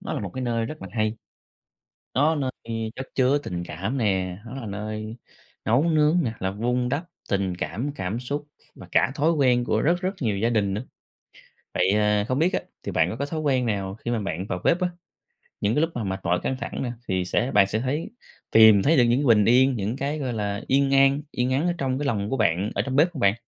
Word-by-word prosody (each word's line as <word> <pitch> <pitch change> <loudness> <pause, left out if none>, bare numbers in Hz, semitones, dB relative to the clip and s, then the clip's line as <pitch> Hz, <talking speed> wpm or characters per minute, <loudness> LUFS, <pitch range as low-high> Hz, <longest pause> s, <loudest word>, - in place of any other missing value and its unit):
nó - - -5
là - - -2
một 100 - -5
cái 130 - -3
nơi 115 -2 0
rất 155 -6 -8
là 95 - -7
hay. 110 0 0 1.0
Nó 150 +4 +3
nơi 135 -4 -1 0.2
khi 115 -1 -3
chất 130 - -6
chứa 130 +2 +3
tình 90 -11 -5
cảm 95 - -4
nè, 95 -5 0
nó 115 - -9
là 135 - -6
nơi 110 +2 -5 0.5
nấu 120 +6 +3
nướng 155 0 +3
nè, 115 -4 -2
là 95 0 -1
vun 125 +4 -1
đắp 145 +6 -1 0.3
tình 95 -2 0
cảm, 125 +10 -3
cảm 100 +2 -3
xúc 145 +4 -4 0.3
và - - -12
cả - - +3
thói 155 +3 +2
quen 130 -6 +3
của 110 -2 0
rất 175 +4 +2
rất 185 +2 -2
nhiều 110 -6 0
gia 115 +4 +1
đình 105 -4 +1
nữa. 105 +4 -3 0.9
Vậy, 90 +1 +2
à, 105 0 +2
không 130 - 0
biết 170 +4 +2
á, - - 0 0.2
thì - - -5
bạn 80 +2 +2
có - - -5
có 140 +3 -2
thói 155 +1 -4
quen 135 -5 +1
nào 100 -3 -2
khi 120 +2 -6
mà 120 - 0
bạn 95 -3 -3
vào 90 - -3
bếp 170 - +3
á, 180 - +1 0.7
những 105 +2 +1
cái 150 - +3
lúc 165 - +2
mà 120 - -2
mệt 95 -1 -3
mỏi, 90 +1 +1
căng 130 - -1
thẳng - - -4
nè 125 - -2 0.2
thì 95 -1 0
sẽ 120 +8 0
bạn 100 -4 +5
sẽ 110 +3 -1
thấy 135 - -2 0.4
tìm 110 -3 +7
thấy 160 +2 +4
được 125 - +6
những 120 +2 +3
cái 145 - 0
bình 105 -1 +3
yên, 130 +3 +5
những 105 +1 -2
cái, 140 +3 -2
gọi 130 -4 -2
là, 105 -1 -2
yên 135 0 +3
an, 135 +1 +4
yên 125 +1 -1
ắng 145 +6 +1
ở 175 - +1
trong 130 -3 -1
cái 145 - -2
lòng 105 -6 -1
của 135 - -1
bạn, 100 -1 +1
ở - - +2
trong 130 -1 -3
bếp 160 +5 +4
không 160 - -7
bạn? 100 -3 +4
120 Hz, 250 wpm, -25 LUFS, 100-140 Hz, 1.0 s, tìm